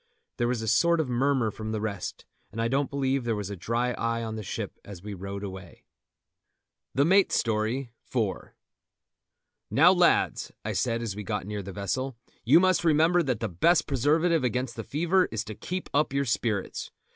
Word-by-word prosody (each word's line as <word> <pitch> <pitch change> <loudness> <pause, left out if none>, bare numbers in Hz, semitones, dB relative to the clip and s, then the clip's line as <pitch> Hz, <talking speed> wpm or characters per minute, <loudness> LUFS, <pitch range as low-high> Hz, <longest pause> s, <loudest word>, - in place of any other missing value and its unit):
There 120 - +1
was 120 -2 -1
a - - -4
sort 170 +10 +3
of 155 -5 0
murmur 125 -2 +1
from 110 +1 -5
the 110 - -1
rest, 105 -3 -4 0.3
and 110 - -7
I 115 - +1
don't 135 +3 0
believe 135 -1 0
there 115 -2 0
was 100 -1 -4
a - - -4
dry 115 +7 -1
eye 115 -1 -2
on 110 -1 -4
the 110 - -4
ship 100 - -5
as 100 -3 -10
we 105 0 -6
rowed 100 +1 -6
away. 95 -2 -9 1.1
THE 140 +2 +4
MATE'S 190 +3 +4
STORY.—IV. 115 +1 -1 1.4
"Now, - - +6
lads," - - +2
I - - -1
said 115 -1 0
as 105 -4 -3
we 105 - -5
got 95 - -3
near 105 0 -4
the 100 0 -7
vessel, 115 +7 -3 0.3
"you 130 +9 +6
must 185 -1 +3
remember 165 +2 +4
that 130 -8 -1
the 115 - 0
best 155 - +3
preservative 160 +4 +2
against 125 -1 -1
the 115 - -5
fever 175 - +2
is 110 - -2
to 110 - -7
keep 180 - -5
up 145 -1 +2
your 140 0 +1
spirits. 110 -4 -2
120 Hz, 190 wpm, -27 LUFS, 105-140 Hz, 1.4 s, Now